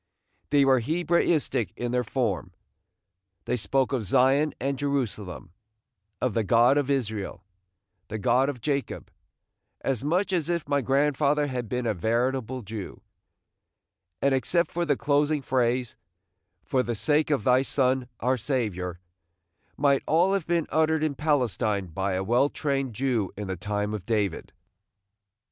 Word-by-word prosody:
They 145 -1 +4
were 130 -1 +5
Hebraistic 155 -3 +1
in 120 0 -2
their 125 0 +1
form; 105 -7 -2 0.9
they - - 0
spoke 130 +5 0
of 125 -4 0
Zion 135 +7 +3
and 135 +2 -1
Jerusalem, 105 - -3 0.7
of 130 -4 0
the 115 - +1
God 120 +5 +4
of 145 -2 0
Israel, 110 -9 -2 0.6
the 110 - -4
God 125 +5 +2
of 125 -5 -5
Jacob, 140 0 -3 0.7
as 130 -3 -1
much 180 +6 0
as 170 -3 0
if 170 -4 -1
my 145 -1 +1
grandfather 145 +2 +2
had 125 -5 -4
been 125 +1 -2
a 110 - +1
veritable 120 +5 -1
Jew; 105 -1 -7 1.2
and 140 0 +3
except 170 +6 +1
for 175 0 -1
the 145 -4 +1
closing 145 0 +1
phrase, 125 -2 0 0.7
"for 130 - +1
the 120 -1 -2
sake 150 +8 +1
of 140 -8 +1
thy 125 +2 +4
Son, 130 -2 +1
our 130 +2 +2
Saviour," 100 - -2 0.8
might 140 -1 +3
all 175 +5 +3
have 195 -5 -1
been 170 -2 +1
uttered 160 0 +2
in 155 -2 +1
Palestine 120 -9 0
by 95 +3 -2
a 95 +1 -1
well 120 +7 +3
trained 135 -6 -2
Jew 120 -6 0
in 105 -1 -5
the 95 - -2
time 105 +3 -2
of 100 -3 -6
David. 105 -6 -1
130 Hz, 150 wpm, -26 LUFS, 110-145 Hz, 1.2 s, were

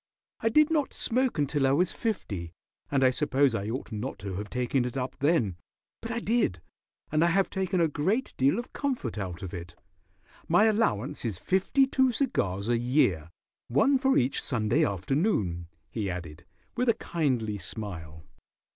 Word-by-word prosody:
"I 225 - +1
did 305 +6 +4
not 300 -4 0
smoke 255 -1 0
until 145 -1 +1
I 135 - +3
was 175 +5 +2
fifty, 100 - -3 0.4
and 135 -1 +2
I 130 - +6
suppose 140 -1 +2
I 105 -1 -2
ought 125 +1 -4
not 110 +5 -4
to 95 0 -6
have 105 +2 -5
taken 125 +1 0
it 125 +1 -4
up 130 0 -3
then, 130 - +2 0.4
but 225 - -6
I 235 0 -1
did, 225 - +1 0.5
and 155 +2 +3
I - - +4
have 190 +3 +2
taken 190 -1 -1
a 165 - +4
great 190 - -1
deal 135 +6 +3
of 240 - -6
comfort 240 - -2
out 90 -2 -5
of 95 - -6
it. 85 -1 -7 0.7
My 175 +6 +5
allowance 210 - +1
is 110 -7 -2
fifty 190 - +2
two 265 -1 +2
cigars 100 - -1
a 120 -1 +2
year, 115 - +2 0.4
one 260 - +3
for 265 0 +3
each 125 +2 +1
Sunday 115 -4 +1
afternoon," 100 - 0 0.2
he 105 -4 -2
added, 85 -2 -7 0.3
with 250 0 +1
a 230 - +4
kindly 125 -11 -1
smile. 85 -5 -7
130 Hz, 175 wpm, -28 LUFS, -, 0.7 s, I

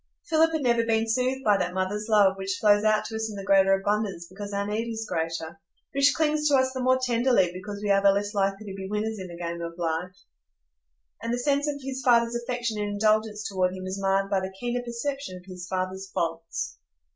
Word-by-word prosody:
Philip 325 0 +4
had 315 -3 -1
never 235 -2 +3
been 225 0 +1
soothed 255 +3 0
by 205 -4 +4
that 180 -1 -2
mother's 205 +3 -2
love 205 -3 +5
which 190 -1 -3
flows 205 -1 +4
out 215 0 +3
to 225 - -6
us 220 0 -2
in 210 - -7
the 195 - -6
greater 195 -1 +4
abundance 205 -3 -1
because 200 +3 -8
our 200 0 -1
need 220 +3 -2
is 225 -1 -4
greater, 165 0 -3 0.3
which 275 +1 +4
clings 305 -1 +1
to 290 - +4
us 260 -1 +3
the 260 - -4
more 255 +1 +4
tenderly 240 -6 +2
because 200 +3 -7
we 205 - +1
are 195 0 +4
the 200 0 +6
less 205 +1 -1
likely 195 +1 0
to 195 - -6
be 190 -1 -6
winners 215 +1 -2
in 185 - -6
the 170 -1 -9
game 170 0 -4
of 170 0 -6
life; 170 +2 -2 1.1
and 230 +1 -3
the 240 - 0
sense 285 +3 +1
of 290 -1 -2
his 265 0 -4
father's 235 -2 +4
affection 240 -2 -2
and 205 - -1
indulgence 215 0 +1
toward 185 -1 0
him 185 - -7
was 190 +1 -4
marred 195 0 +2
by 195 -1 +1
the 190 0 -4
keener 245 0 -1
perception 245 -3 -4
of 180 - -15
his 180 -2 -8
father's 190 +1 -3
faults. 165 - -3
205 Hz, 225 wpm, -26 LUFS, 190-235 Hz, 1.1 s, the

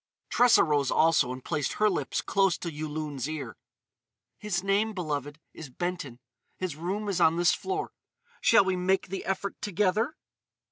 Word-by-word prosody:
Tressa 245 -1 +6
rose 145 -4 +1
also 160 -6 +3
and 130 0 -8
placed 150 -5 -1
her 215 - +2
lips 160 -9 -1
close 195 -2 +2
to 170 - -5
Yulun's 150 -2 -4
ear: 140 -9 -5 0.8
"His 195 -4 -2
name, 205 +3 +1
beloved, 150 -5 -4
is 155 -4 -9
Benton. 145 -4 -4 0.4
His 185 -5 -3
room 190 +7 -3
is 195 -3 -1
on 160 - +5
this 175 0 +4
floor. 390 +1 -3 0.5
Shall 225 -4 +5
we 190 -1 +1
make 185 +1 0
the 195 +1 -4
effort 195 +1 -3
together?" 210 - 0
175 Hz, 155 wpm, -28 LUFS, 150-195 Hz, 0.8 s, Tressa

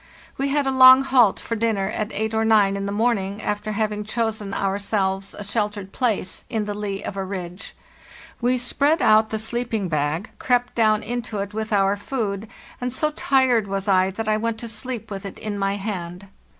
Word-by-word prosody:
We 275 - -1
had 285 0 +1
a 270 - +1
long 260 0 +8
halt 250 -6 +4
for 230 - -4
dinner 215 -3 0
at 215 +1 -3
eight 220 +1 -2
or 220 0 +1
nine 210 -3 +4
in 200 0 -3
the - - -2
morning, 205 -2 0
after 210 0 -3
having 210 0 -1
chosen 220 -2 -2
our 195 0 -1
selves 195 -1 -1
a 205 - -6
sheltered 205 -1 -2
place 215 -7 -1
in 220 -2 -1
the 205 - -3
lee 205 -1 -4
of - - -5
a 195 - -2
ridge. 185 0 -6 0.7
We 250 +2 +2
spread 280 +6 +1
out 220 0 +5
the 220 - -2
sleeping 225 -3 -2
bag, 155 +4 -1
crept 245 -1 +1
down 215 -2 +3
into 240 -2 -4
it 200 +1 -4
with 220 +1 -4
our 200 0 +3
food, 210 -2 -3 0.3
and 250 0 -2
so 305 +5 0
tired 260 -7 +2
was 195 +1 -3
I 190 -1 +4
that 215 +3 -5
I 215 0 +2
went 230 0 -2
to 235 - -5
sleep 225 0 -5
with 195 -1 -5
it 195 - -7
in 210 -2 -4
my 195 0 0
hand. 190 -3 -5
215 Hz, 200 wpm, -23 LUFS, 195-230 Hz, 0.7 s, long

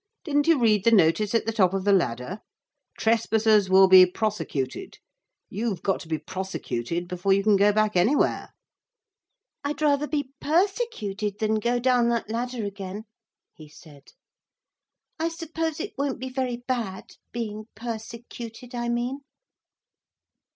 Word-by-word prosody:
Didn't 290 -2 +1
you 330 -2 +5
read 215 -5 +3
the - - +5
notice 205 +1 +3
at 230 - +1
the 225 - 0
top 195 -4 +2
of 195 - -2
the 200 0 +3
ladder? 140 - -1 0.6
Trespassers 220 -2 +2
will 190 0 +7
be 185 -1 +9
prosecuted. 180 - -3 0.5
You've 205 -3 -3
got 195 - 0
to - - -11
be 160 -1 -1
prosecuted 175 -2 -4
before 180 +2 0
you 200 +1 +2
can 210 0 +4
go 200 +1 +4
back 215 0 +1
anywhere.' 220 +12 +2 1.1
'I'd 285 +1 -3
rather 295 0 +2
be 285 -3 -3
persecuted 300 - -1
than 215 0 0
go 240 +2 0
down 245 -1 +2
that 235 -2 -2
ladder 240 -1 -3
again,' 200 +1 -6 0.5
he 155 -2 -14
said. 150 -2 -17 1.1
'I 325 +1 0
suppose 325 -1 -4
it 405 +5 -5
won't 280 -2 -1
be 260 +1 -5
very 255 -2 -2
bad 230 -7 -3 0.2
being 215 -2 -5
persecuted, 230 +1 -8
I 240 -1 -2
mean?' 240 +3 -2
220 Hz, 145 wpm, -25 LUFS, 195-250 Hz, 1.1 s, be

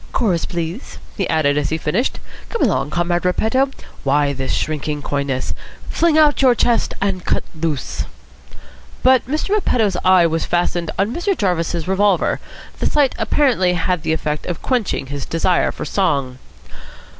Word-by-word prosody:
"Chorus, 185 -9 +1
please," 170 - -5 0.2
he 195 - -2
added, 150 -2 +2
as 145 - -1
he 160 - -1
finished. 185 - -1 0.3
"Come 465 - -1
along, 185 - +1
Comrade 175 +1 0
Repetto. 220 +9 +2 0.3
Why 145 +1 +2
this 135 -1 -3
shrinking 150 -1 -2
coyness? 140 -2 -2 0.4
Fling 330 -2 +3
out 300 -2 +4
your 255 -3 +5
chest, 235 0 +1
and 195 -2 -1
cut - - 0
loose." 155 -4 -3 1.0
But 260 -1 +4
Mr. 305 +7 -2
Repetto's 235 - +1
eye 185 -2 +6
was 165 0 0
fastened 175 -1 0
on 200 +4 0
Mr. 370 +4 -1
Jarvis's 175 -4 -1
revolver. 190 -1 +2 0.4
The - - +1
sight 290 -3 +2
apparently 225 -6 +2
had 180 0 0
the 160 - -1
effect 150 -1 -2
of 175 - -4
quenching 240 - 0
his 140 +1 -5
desire 170 +2 +1
for - - -6
song. 140 -10 0
180 Hz, 155 wpm, -19 LUFS, 155-230 Hz, 1.0 s, eye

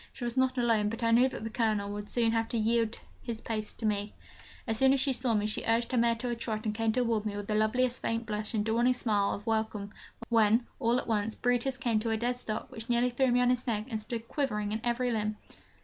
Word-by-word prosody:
She 250 - -8
was 240 0 -2
not 260 0 +2
alone, 225 -4 +2
but 230 +2 -5
I 230 - +3
knew 245 +3 +5
that 260 - -7
the 225 - -4
Colonel 215 -3 0
would 205 0 -6
soon 230 -2 +2
have 225 0 0
to 235 - -1
yield 230 0 +1 0.2
his 230 -2 -5
place 215 -2 -4
to 225 - -6
me. 205 -1 -1 0.5
As 225 -1 -2
soon 265 0 +6
as 275 - +2
she 270 0 +3
saw 245 -2 +1
me, 210 0 +1
she 215 - -2
urged 230 +1 +1
her 255 - +1
mare 235 0 +3
to 245 +2 -4
a 240 - -1
trot, 225 -1 -4
and 215 - 0
came 225 0 +1
towards 230 -3 +1
me 210 -1 -3
with 205 - -4
the 215 - -2
loveliest 245 +4 +1
faint 230 0 -1
blush 210 +1 -3
and 210 -1 0
dawning 235 +3 +3
smile 210 -5 +1
of 205 - -7
welcome, 220 -2 -1 0.3
when, 225 0 +4
all 235 -1 +2
at - - -2
once, 220 -1 -1
Brutus 245 +2 0
came 235 -4 +1
to 225 +1 -2
a 220 - +1
dead 240 +2 0
stop, 220 -3 -5
which 225 +1 -9
nearly 240 +1 +2
threw 260 +2 +2
me 245 +1 +3
on 250 0 +4
his 250 +1 -1
neck, 215 -2 -1
and 220 -1 -2
stood 230 +1 -5
quivering 210 -8 -1
in 220 +1 -2
every 245 +1 0
limb. 215 -1 -1
230 Hz, 260 wpm, -30 LUFS, 215-245 Hz, 0.5 s, soon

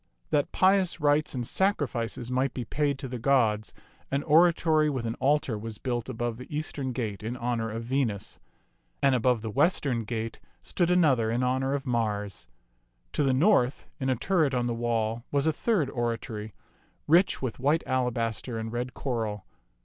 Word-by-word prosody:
That 145 +4 +1
pious 190 -1 +3
rites 150 0 +2
and 125 -1 -2
sacrifices 125 - -1
might 130 +1 0
be 125 - -3
paid 145 +3 0
to 135 - -6
the 125 -1 -5
gods, 115 -5 +2 0.4
an 140 +1 -1
oratory 160 -1 +4
with 130 -5 -3
an 115 - -1
altar 135 -5 +1
was 110 0 -6
built 120 -2 -3
above 120 -1 -3
the 125 - -9
eastern 145 -3 -3
gate 110 -5 -3
in 115 +4 -4
honor 120 -2 -1
of 115 +1 -4
Venus; 115 -5 -2 0.6
and 135 -1 +5
above 125 -2 +2
the 110 - -3
western 130 - +2
gate 115 0 -4 0.2
stood 175 - 0
another 145 -11 +3
in 120 +2 0
honor 130 +2 +1
of 140 0 -4
Mars. 105 - -2 0.7
To - - 0
the 135 -2 +3
north, 135 -2 +3
in 135 -1 -1
a 130 - +2
turret 155 0 +1
on 120 -1 +1
the 120 - 0
wall, 115 -1 -1
was 140 0 +1
a 160 - +3
third 185 - +1
oratory, 115 -3 -3 0.5
rich 170 -1 +3
with 130 -2 -3
white 145 +5 +2
alabaster 120 -2 -1
and 110 0 -4
red 125 +2 -3
coral. 110 -6 -3
125 Hz, 170 wpm, -28 LUFS, 115-145 Hz, 0.7 s, and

